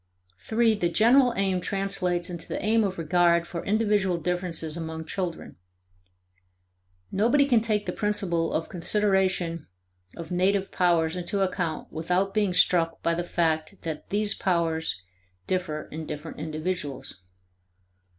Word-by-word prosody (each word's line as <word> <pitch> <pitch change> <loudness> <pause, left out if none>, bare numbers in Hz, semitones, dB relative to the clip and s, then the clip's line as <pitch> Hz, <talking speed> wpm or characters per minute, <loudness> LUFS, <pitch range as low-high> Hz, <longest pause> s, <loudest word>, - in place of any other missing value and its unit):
(3) 225 0 +2
The 180 -5 0
general 245 +7 +5
aim 190 -2 +1
translates 190 -3 -1
into 170 -2 -7
the - - -3
aim 225 +1 +3
of 190 -2 -2
regard 170 +1 +3
for 170 -1 -6
individual 205 -4 +1
differences 170 -2 -2
among 160 -1 -5
children. 180 0 -4 1.5
Nobody 235 +8 +3
can 245 -5 +3
take 215 -2 0
the - - -2
principle 190 -6 0
of 160 - -1
consideration 185 -3 +1 0.5
of 165 0 -8
native 190 +2 +1
powers 170 -2 +2
into 190 +3 -2
account 180 -4 -2
without 180 +5 0
being 210 -3 +2
struck 170 -2 +2
by 170 - +2
the 175 +1 -1
fact 165 +1 -1
that 160 -2 -5
these 210 +1 +2
powers 160 - 0 0.4
differ 170 -5 -2
in 155 0 -6
different 150 +1 -7
individuals. 155 - -4
180 Hz, 130 wpm, -26 LUFS, 165-200 Hz, 1.5 s, general